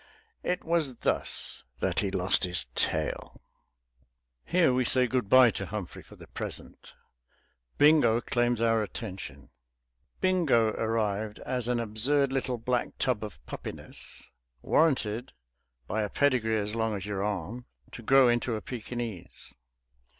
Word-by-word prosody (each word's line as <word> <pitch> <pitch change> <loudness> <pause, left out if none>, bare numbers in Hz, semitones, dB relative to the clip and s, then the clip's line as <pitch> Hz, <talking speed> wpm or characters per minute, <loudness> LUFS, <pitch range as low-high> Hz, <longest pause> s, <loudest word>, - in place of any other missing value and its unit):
It 180 - -2
was 160 -6 0
thus - - 0 0.2
that - - 0
he 100 - 0
lost 95 -1 +3
his 90 -2 +1
tail. - - -2 1.0
Here 170 - +3
we 130 0 +2
say 125 +1 +4
good 125 -4 -1
bye 130 -1 +7
to - - -5
Humphrey 105 -4 -6
for - - -16
the - - -13
present; - - -6 0.8
Bingo 145 -6 +5
claims 120 -1 0
our 115 -1 +3
attention. 95 - -7 0.7
Bingo 165 -12 +3
arrived 110 -1 -1
as 125 -2 -2
an 125 -1 +1
absurd 130 +5 +1
little 130 -2 -1
black 125 +1 -2
tub 125 -5 0
of 105 -3 -9
puppiness, - - -7 0.4
warranted 125 -7 +1 0.5
(by 110 - -1
a 105 - -2
pedigree 120 -5 +1
as 105 0 -2
long 110 -1 0
as 95 -1 -5
your 100 -2 -3
arm) 105 +4 -4 0.3
to - - -9
grow 135 +3 +5
into 120 0 +1
a 105 - -4
Pekinese. 120 -5 -7
115 Hz, 135 wpm, -28 LUFS, 105-130 Hz, 1.0 s, bye